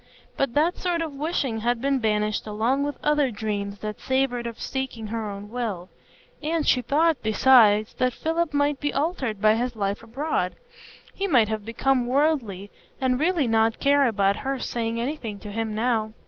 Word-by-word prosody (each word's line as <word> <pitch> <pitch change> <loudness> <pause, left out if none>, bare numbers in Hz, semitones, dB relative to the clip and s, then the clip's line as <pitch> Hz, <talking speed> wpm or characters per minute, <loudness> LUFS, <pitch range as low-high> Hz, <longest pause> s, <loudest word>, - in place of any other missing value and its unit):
But 275 -4 -1
that 320 +5 +2
sort 345 -2 0
of 315 -3 -5
wishing 275 -5 -2
had 240 +2 0
been 275 +1 +1
banished 215 -1 0
along 225 +6 0
with 290 0 -2
other 295 -2 +3
dreams 205 -2 -3
that 210 -1 -5
savored 260 -2 0
of 230 -1 -7
seeking 265 -4 -4
her 220 0 -3
own 200 +1 -8
will; 215 -8 -4 0.5
and 315 +1 -1
she 250 - +4
thought, 305 +4 +2
besides, 215 -2 +5
that 255 0 +2
Philip 325 +4 -1
might 285 -1 +1
be 290 -1 -1
altered 275 - -1
by 215 +1 +5
his 240 +2 -1
life 200 -1 -2
abroad,—he 315 - -5
might 240 - +4
have 215 -1 -3
become 245 +3 0
worldly, 250 -8 0 0.3
and 255 -1 +1
really 330 -1 +2
not 225 -1 +2
care 280 -1 +4
about 200 -3 +2
her 270 0 -2
saying 230 -2 -3
anything 235 -5 -4
to 205 +1 -9
him 220 0 -3
now. 220 -1 0
245 Hz, 175 wpm, -25 LUFS, 215-285 Hz, 0.5 s, besides